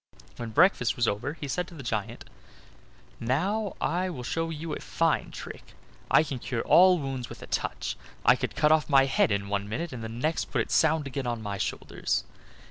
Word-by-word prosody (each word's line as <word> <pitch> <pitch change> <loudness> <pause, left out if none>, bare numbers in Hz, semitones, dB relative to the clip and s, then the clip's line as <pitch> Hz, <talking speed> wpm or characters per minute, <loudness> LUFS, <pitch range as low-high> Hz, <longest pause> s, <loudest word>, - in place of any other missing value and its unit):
When 120 -1 -5
breakfast 145 - +3
was 120 -2 +1
over 120 +8 -1
he 150 - -6
said 180 +6 -2
to 170 - -12
the 140 - -8
giant: 110 -4 -3 0.9
"Now 190 - 0
I 180 +3 0
will 130 -8 -6
show 165 +6 -2
you 160 0 -5
a - - -4
fine 165 -1 0
trick. - - -10 0.3
I 150 - +6
can 140 -4 -5
cure 120 -1 -3
all 185 0 +6
wounds 135 -5 -4
with - - -10
a - - -6
touch; - - -2 0.3
I - - +7
could - - -4
cut 150 0 +3
off 155 -1 +3
my 135 -2 +6
head 135 - +2
in 100 0 0
one 100 0 -2
minute, 160 +7 -3
and 115 -2 -6
the 110 - -4
next 125 +8 -1
put - - -1
it - - -4
sound 160 -2 +3
again 135 -1 -4
on 120 -2 -3
my 100 -1 -4
shoulders. - - -2
135 Hz, 210 wpm, -28 LUFS, 115-165 Hz, 0.9 s, I